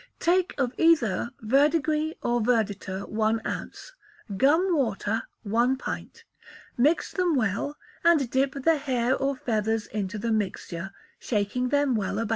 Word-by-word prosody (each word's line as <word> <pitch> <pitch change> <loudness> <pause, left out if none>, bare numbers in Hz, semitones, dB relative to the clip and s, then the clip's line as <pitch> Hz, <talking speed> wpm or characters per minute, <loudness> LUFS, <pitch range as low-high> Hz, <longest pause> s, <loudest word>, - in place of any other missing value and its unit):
Take 360 +1 +1
of 260 -3 0
either 240 - +3
verdigris 300 +6 +2
or 240 0 +1
verditer 205 -4 -1
one 220 +1 +1
ounce; - - -6 0.4
gum 325 - +3
water, 220 -5 0 0.2
one 235 +5 +2
pint; - - -6 0.5
mix 295 +7 +2
them 360 -4 +1
well, 225 +4 -1 0.3
and 325 -6 +4
dip 265 +1 +1
the 325 +1 +4
hair 260 -3 0
or 275 0 -1
feathers 220 -3 -1
into 210 0 -4
the 230 +2 -2
mixture, 195 -4 -3 0.3
shaking 235 +3 -1
them 285 -1 +2
well 200 -2 -1
about. 225 -1 -2
245 Hz, 135 wpm, -26 LUFS, 215-290 Hz, 0.5 s, and